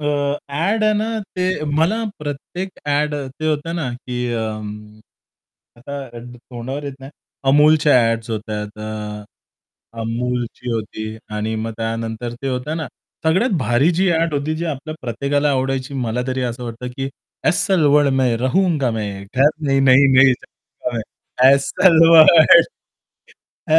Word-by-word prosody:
अ, - - -6 0.4
add 175 +10 0
आहे 215 - +4
ना, 215 +1 0 0.3
ते 180 - 0 0.3
मला 190 +9 +1 0.2
प्रत्येक 150 +6 -5 0.2
अ‍ॅड 150 +1 +1 0.2
ते 155 - -3
होतं 155 +1 -1
ना 160 -5 -2
की 125 0 -6
अं, 110 -2 -3 1.1
अ, - - -18
आता 135 -2 -7 0.2
तोंडावर 125 +4 -7
येत 140 - -5
नाही. 135 +1 -10 0.4
अमूलच्या 150 +1 +5
अ‍ॅड्स 115 0 -1
होत्या 110 -1 -4
अ, 105 0 -7 0.8
अमूलची 120 +1 -3
होती 110 0 -5 0.2
आणि 110 +1 -2
मग 115 +1 -4
त्यानंतर 115 +1 -4
ते 135 - -2
होत 125 +1 -3
ना 160 -2 -4 0.4
सगळ्यात 185 +10 +2
भारी 125 +7 +3
जी 190 0 +3
अ‍ॅड 165 -1 +1
होती 145 +2 -1
जी 165 - -3
आपल्या 150 +4 -8
प्रत्येकाला 140 +5 0
आवडायची 135 0 -2
मला 115 +2 -1
तरी 130 0 -2
असं 125 +1 -7
वाटतं 120 +1 -6
की 135 0 -3 0.4
एस्सल 185 -2 +2
वर्ल्ड 145 -2 +4
में 125 -3 +2
रहूंगा 140 +1 +1
मैं 100 -3 -4
घर 135 +3 +5 0.2
नही 135 0 +2
नही 135 0 +6
जाउंगा 125 0 -8
मै 115 - -2 0.5
एस्सल 160 +5 +3
वर्ल्ड, 160 0 +8 1.0
एस्सल 160 +1 +6
135 Hz, 145 wpm, -19 LUFS, 115-150 Hz, 1.1 s, वर्ल्ड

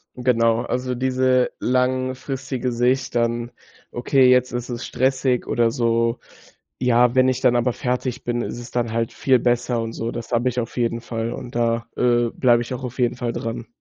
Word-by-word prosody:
Genau. 115 -2 +2
Also, 125 +1 -2
diese 130 0 +2
langfristige 130 0 -1
Sicht 125 +2 0
dann: 120 0 0 0.4
„Okay, 130 +1 +3
jetzt 125 0 +4
ist 120 0 -4
es 120 -1 -4
stressig 130 -1 0
oder 120 -1 +2
so“, 115 -1 +1 0.6
ja, 125 -1 +3
wenn 130 0 +5
ich 130 0 -1
dann 120 - +4
aber 120 0 +1
fertig 125 +1 -3
bin, 120 0 -1
ist 120 - -5
es 120 +1 -10
dann 120 -2 -1
halt 115 0 -1
viel 130 -2 +3
besser 120 0 0
und 115 0 -4
so. 115 0 -3
Das 115 -1 -7
habe 120 +1 +2
ich 125 0 -3
auf 115 +1 -5
jeden 115 -1 0
Fall 115 -1 -4
und 120 - -8
da, 115 0 0
äh, 120 -1 +2
bleibe 120 -2 +3
ich 120 - -6
auch 125 - -6
auf 125 0 -6
jeden 125 0 +2
Fall 120 -1 -3
dran. 115 0 -5
120 Hz, 190 wpm, -22 LUFS, 115-130 Hz, 0.6 s, wenn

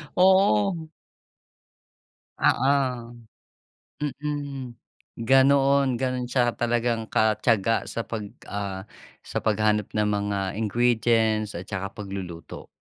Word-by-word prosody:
Oo. 180 - +3 1.5
Oo. 125 -3 +1 0.9
Mm, 140 -3 -4 0.4
ganoon, 135 +2 +4
gano'n 125 0 -2
siya 125 -1 +2
talagang 120 -1 -1
katiyaga 110 0 +1
sa 115 - -3
pag 110 -3 -5 0.2
ah, 100 -2 -4 0.4
sa - - -3
paghanap 105 -1 +1
ng 105 0 +2
mga 100 0 -2 0.2
ingredients, 110 -1 +1
at 85 - -5
saka 95 +1 -3
pagluluto. 95 -5 -7
115 Hz, 90 wpm, -25 LUFS, 105-130 Hz, 1.5 s, ganoon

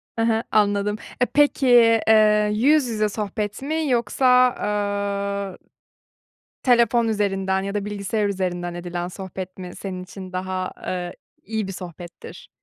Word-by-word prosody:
Hı 225 - -1
hı, 225 0 +1
anladım. 205 0 +2 0.2
E, - - +6
peki, 290 -1 +2 0.4
eee, 210 -1 +5
yüz 275 +4 +3
yüze 215 -2 0
sohbet 210 +1 -4
mi 310 +1 -1
yoksa, 240 +1 0 0.2
aaa 200 -3 -2 1.1
telefon 235 -2 +4
üzerinden 195 -3 0
ya 200 - -4
da 205 -1 -1
bilgisayar 205 +1 -1
üzerinden 180 -3 -2
edilen 175 0 -4
sohbet 185 0 -7
mi 180 -1 -7
senin 185 -2 -6
için 185 0 -10
daha, 185 0 -3 0.2
ııı, 180 -1 -3 0.3
iyi 215 -1 -3
bir - - -4
sohbettir? 175 -2 -10
205 Hz, 135 wpm, -23 LUFS, 185-220 Hz, 1.1 s, E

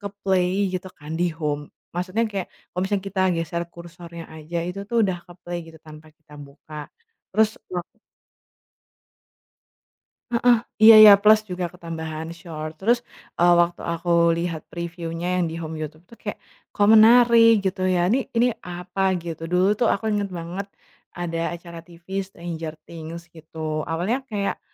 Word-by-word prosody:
ke-play 195 -1 0
gitu 185 0 -4
kan, 150 +2 -9
di 175 - +3
home. 150 -3 -3 0.2
Maksudnya 185 +6 -1
kayak, 200 -4 -4 0.2
kalau 180 - -3
misalnya 200 -1 -1
kita 190 - -1 0.2
geser 170 +1 -2
kursornya 170 0 -11
aja 160 +2 -4
itu 180 +3 -5
tuh 230 -1 +3
udah 180 -3 -2
ke-play, 175 0 -7
gitu, 160 - -13
tanpa 155 0 -13
kita 150 -1 -15
buka. 145 +1 -10 0.5
Terus 220 0 +2
wak 180 -1 -4 2.5
Heeh. 240 0 +4 0.3
Iya 225 - +11
iya, 210 -1 +11
plus 215 +2 +5
juga 180 0 -3
ketambahan 160 -2 -6
Shorts. 155 -2 -7
Terus, 235 +4 +3 0.4
eee, 175 0 +6
waktu 175 0 0
aku 170 +1 -3 0.3
lihat 170 -2 -3
preview-nya 170 +1 -3
yang - - +2
di 165 - -6
home 160 -1 -6
YouTube 155 +2 -7
tuh 230 - -18
kayak, - - -5 0.3
"Kok 205 0 +1
menarik?" 230 -1 +7
Gitu 190 0 -1
ya, 180 +2 +2
"ini 265 +1 0
ini, 245 +1 +3
apa?" 180 +2 -2
gitu. 165 -1 -6
Dulu 185 +3 +3
tuh, 225 +2 +1
aku 220 - 0
ingat 205 -1 -1
banget, 180 +2 -6 0.5
ada 165 -1 -2
acara 170 -1 -10
TV 175 +3 -6
Stranger 170 -4 -6
Things 165 +1 -8
gitu. 155 -1 -5
Awalnya 180 +11 -1
kayak 200 -3 -2
175 Hz, 155 wpm, -23 LUFS, 165-195 Hz, 2.5 s, Iya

